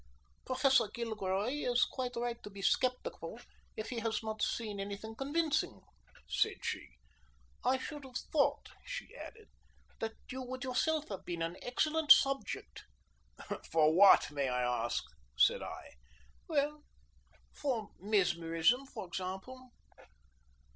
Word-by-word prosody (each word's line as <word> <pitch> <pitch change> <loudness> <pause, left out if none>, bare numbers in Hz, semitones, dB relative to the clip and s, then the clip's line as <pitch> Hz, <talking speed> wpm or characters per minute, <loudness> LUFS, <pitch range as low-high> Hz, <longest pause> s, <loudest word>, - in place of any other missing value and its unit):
"Professor 260 -2 +4
Gilroy 215 -2 -1 0.2
is 245 0 +4
quite 250 -2 -4
right 240 0 -2
to - - -8
be 200 -1 -9
sceptical 250 +4 0 0.4
if 215 - -4
he 240 - -2
has 225 0 -1
not 220 -1 -4
seen 210 -3 -1
any 200 0 -3
thing 220 +2 -8
convincing," 300 +5 0 0.5
said - - +1
she. - - -4 0.7
"I 255 +2 +3
should 290 +2 -6
have 255 -2 -5
thought," 285 -1 +2
she - - -6
added, 440 -1 -10 0.5
"that 225 0 -2 0.2
you 260 +1 -4
would 255 +1 -5
yourself 295 +4 0
have 195 -3 -5
been 170 -1 -3
an 165 +1 -3
excellent 305 +5 +2
subject." 275 0 +4 0.8
"For 155 -1 +4
what, 190 -3 +7
may 140 -2 0
I 125 -2 0
ask?" 120 - -1 0.3
said 60 - +5
I. - - -7 0.6
"Well, 295 -1 0 0.7
for 245 -7 -2
mesmerism, 185 +4 +2
for 225 -7 -7
example." 190 +9 -6
235 Hz, 130 wpm, -34 LUFS, 195-270 Hz, 0.8 s, what